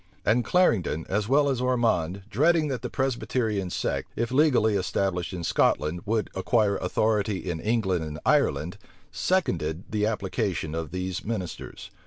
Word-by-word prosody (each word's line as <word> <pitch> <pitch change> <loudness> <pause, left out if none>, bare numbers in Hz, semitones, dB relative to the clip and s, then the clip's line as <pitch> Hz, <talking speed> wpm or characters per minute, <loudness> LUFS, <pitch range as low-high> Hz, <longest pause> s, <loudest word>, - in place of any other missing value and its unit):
And 115 +4 +3
Clarendon, 110 - +2
as 105 +1 0
well 140 +2 +4
as 130 -3 0
Ormond, 110 -8 +1
dreading 155 +7 +2
that 130 -4 -3
the 125 - -4
Presbyterian 120 -7 -1
sect, - - -2
if 115 +1 -2
legally 130 -6 +4
established 95 -1 -1
in 90 -2 -5
Scotland, 80 +1 +1
would 110 -2 0
acquire 100 +1 +1
authority 105 +2 0
in 85 -3 -4
England 95 -5 0
and 75 -1 -6
Ireland, 75 +6 +1 0.3
seconded 85 - 0
the 105 -1 +1
application 105 -7 -2
of 80 -1 -3
these 90 -1 -4
ministers. 105 -6 -5
105 Hz, 145 wpm, -26 LUFS, 90-120 Hz, 0.3 s, well